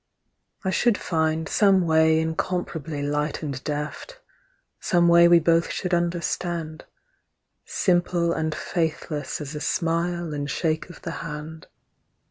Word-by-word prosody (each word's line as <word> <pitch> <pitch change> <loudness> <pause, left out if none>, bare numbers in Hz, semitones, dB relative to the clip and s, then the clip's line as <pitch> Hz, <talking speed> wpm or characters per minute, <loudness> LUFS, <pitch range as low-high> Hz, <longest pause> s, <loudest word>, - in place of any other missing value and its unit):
I 190 - +1
should 235 +4 +2
find 160 -1 -1
Some 195 -1 +4
way 160 0 +4
incomparably 160 -2 -3
light 150 +2 -2
and 140 -3 -4
deft, 150 - -5 0.6
Some 175 -1 +2
way 170 0 +7
we 170 0 +7
both 165 0 +2
should 180 -1 -3
understand, 170 -1 -2 0.8
Simple 175 -2 +1
and 160 -1 -2
faithless 155 -3 -3
as 145 0 -6
a 150 - -5
smile 170 0 -1
and 145 0 -3
shake 155 +4 -1
of 175 - -13
the 165 - -4
hand. 155 0 -7
165 Hz, 125 wpm, -24 LUFS, 155-175 Hz, 0.8 s, way